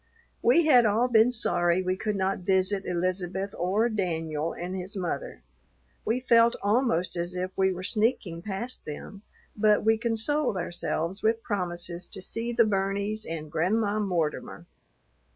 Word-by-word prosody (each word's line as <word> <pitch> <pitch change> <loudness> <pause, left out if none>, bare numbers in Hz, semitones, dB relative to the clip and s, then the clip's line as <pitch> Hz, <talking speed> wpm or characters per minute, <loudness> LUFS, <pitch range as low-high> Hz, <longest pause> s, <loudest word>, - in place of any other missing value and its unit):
We 340 -9 +4
had 250 -7 +6
all 220 +4 +2
been 230 0 +5
sorry 175 -6 +2
we 185 0 0
could 210 +2 -2
not 195 0 0
visit 190 +1 +1
Elizabeth 185 +2 -1
or 195 +6 +1
"Danyul" 165 -7 -2
and 180 +2 -4
his 190 +3 -5
mother. 175 - -4 0.6
We 230 +3 +1
felt 235 -2 +4
almost 205 -5 +1
as 175 +1 -3
if 185 +1 -3
we 190 0 +2
were 185 0 -6
sneaking 210 -5 0
past 215 +6 -5
them, 175 +6 -8 0.3
but 210 0 +3
we 220 0 +3
consoled 235 +2 0
ourselves 175 +1 -2
with 225 +1 +1
promises 175 -3 -3
to 190 - -9
see 230 +4 -4
the 235 -1 +4
Burneys 200 +1 -1
and 155 -2 -6
Grandma 205 +6 +1
Mortimer. 175 -7 -2
195 Hz, 150 wpm, -27 LUFS, 180-220 Hz, 0.6 s, had